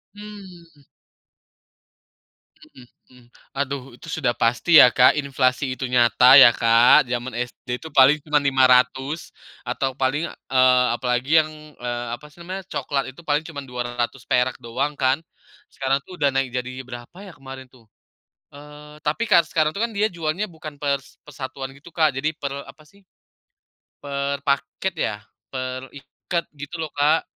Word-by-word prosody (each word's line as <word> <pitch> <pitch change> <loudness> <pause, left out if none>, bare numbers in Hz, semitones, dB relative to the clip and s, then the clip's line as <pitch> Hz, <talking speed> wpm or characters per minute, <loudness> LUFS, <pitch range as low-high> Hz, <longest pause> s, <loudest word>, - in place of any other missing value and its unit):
Mmm. 185 -7 -13 1.8
Mhm 125 -2 -17 0.3
mhm. 125 -1 -19 0.3
Aduh, 140 -1 -2
itu 145 - -15
sudah 125 -6 0
pasti 120 +8 +5
ya - - +9
Kak, 125 - +5
inflasi 135 -1 0
itu 130 - -4
nyata 125 0 +3 0.2
ya 120 - +10
Kak, 115 +2 +5
jaman 120 +1 -3
SD 125 0 -7
itu 160 - -9
paling 135 +2 +6
cuman 150 -1 +2
Rp500 130 +3 +2 0.4
atau 135 -1 -1
paling, 135 +4 0
eee, 130 -1 +2
apalagi 125 +2 -2
yang, 155 - -8 0.3
eee, 120 0 -4
apa 150 - -16
sih 175 - -21
namanya, 190 +2 -6
coklat 140 -1 -2
itu, 135 - -15
paling 150 +1 +1
cuman 145 -4 -7
Rp200 125 +1 -2
doang 130 +5 -2
kan. 130 +1 +2 0.6
Sekarang 135 0 0
tuh, 180 -1 -11
udah 145 - +3
naik 135 -1 +1
jadi 130 +1 -4
berapa 120 +7 -10
ya, 190 - -11
kemarin 135 -1 -10
tuh, 120 -4 -21 0.7
eee, 150 +1 -13
tapi 155 +10 0
kar 170 - +7
sekarang 155 -1 +1
tuh 200 - -5
kan, 235 - -3
dia 210 +2 +2
jualnya 165 +3 -2
bukan 155 -2 -10
per 140 -1 +1 0.3
per 150 - -14
satuan 130 0 -6
gitu, 140 +4 -15
Kak. 155 -3 +3
Jadi, 155 +4 -1
per 140 -1 -5 0.2
apa 155 - -15
sih, 200 - -23 1.0
per 140 0 -3
paket 140 +6 -1
ya, 110 - -3 0.4
per 130 0 -5
ikat, 155 +5 -5
gitu 145 +4 -8
loh 155 - -5
Kak. 150 +3 +3
140 Hz, 155 wpm, -22 LUFS, 125-155 Hz, 1.8 s, ya